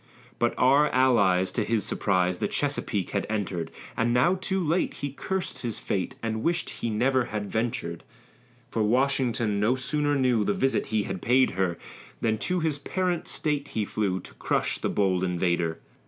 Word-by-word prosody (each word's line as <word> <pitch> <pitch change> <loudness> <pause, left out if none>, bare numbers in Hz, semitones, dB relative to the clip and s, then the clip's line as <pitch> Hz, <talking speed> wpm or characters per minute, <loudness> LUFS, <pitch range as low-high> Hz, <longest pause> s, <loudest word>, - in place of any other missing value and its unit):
But 120 0 +1
our 140 +4 +5
allies, 100 -8 +3
to 110 - 0
his 110 0 0
surprise, 90 -2 +1
The - - 0
Chesapeake 130 -9 -1
had 100 - -1
enter'd; 95 -6 -2 0.3
And 115 +1 +1
now 125 +9 +4
too 190 +1 -1
late, 170 +1 0
he 140 -1 -4
curs'd 190 +6 -3
his 115 -4 -3
fate, 95 -3 -2
And 110 -1 -2
wish'd 170 +4 0
he 115 - -4
ne'er 125 +3 +2
had 105 -3 -4
ventur'd, 110 -7 -2 0.7
For 115 - 0
Washington 120 -2 +1
no 110 +5 +3
sooner 145 +3 0
knew 125 -5 +2
The 105 - 0
visit 135 0 +1
he 110 -2 0
had 95 -3 -5
paid 130 +2 +4
her, 90 -2 -1 0.4
Than 110 -1 0
to 180 +6 0
his 155 -3 0
parent 180 +1 -1
State 145 -2 -1
he 110 -5 -2
flew, 100 -3 -1
To - - -13
crush - - -1
the - - -1
bold 95 -2 +1
invader. 85 -2 0
115 Hz, 175 wpm, -27 LUFS, 100-140 Hz, 0.7 s, our